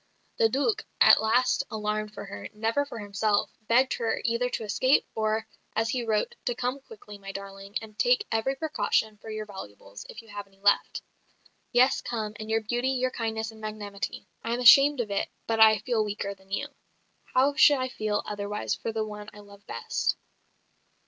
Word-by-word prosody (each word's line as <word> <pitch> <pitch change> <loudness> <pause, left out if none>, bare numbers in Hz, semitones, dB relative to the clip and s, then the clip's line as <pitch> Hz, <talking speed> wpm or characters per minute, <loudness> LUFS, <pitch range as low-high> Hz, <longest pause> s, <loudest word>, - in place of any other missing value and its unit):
The 225 - +4
Duc, 400 - 0 0.2
at - - +7
last 240 +3 +2
alarmed 215 -1 -2
for - - -6
her 195 - -8
never 225 +6 0
for 235 - -8
himself 205 0 0 0.2
begged 255 +3 +4
her 230 -1 0
either 240 +1 +1
to 230 - -3
escape, 255 +6 +3
or, 220 0 0 0.3
as 225 +1 +1
he 255 -2 -1
wrote, 220 -2 0
to 245 - 0
"come 250 +3 -2
quickly, 265 - -13
my 195 0 -7
darling, 195 +1 -9
and 215 -1 -13
take - - +3
every 225 +5 0
precaution 270 -7 0
for 220 - -10
your 215 0 -4
valuables, 100 - -10
if - - -9
you - - -19
have 205 -1 -7
any 195 0 -26
left. 205 0 +2 0.7
Yes, 255 +2 +4
come, 215 -3 -3
and 215 0 -6
your 225 0 +2
beauty, 240 +4 -1
your 255 -1 0
kindness 225 -1 -3
and 220 0 -15
magnanimity. 205 -2 -5 0.2
I 230 - -1
am - - -4
ashamed 275 +3 +7
of 215 -3 -5
it, 200 - -1 0.2
but 225 -1 -1
I 220 -1 +8
feel 220 +1 0
weaker 205 -1 -3
than 190 0 -23
you. 195 - -2 0.7
How 270 +3 +4
should 290 0 +6
I 255 0 -2
feel 215 -4 -2
otherwise 205 0 -3
for 225 - -3
the 220 -1 -2
one 210 -1 -8
I 210 - -12
love 200 0 -17
best?" 115 - -1
220 Hz, 190 wpm, -27 LUFS, 205-245 Hz, 0.7 s, I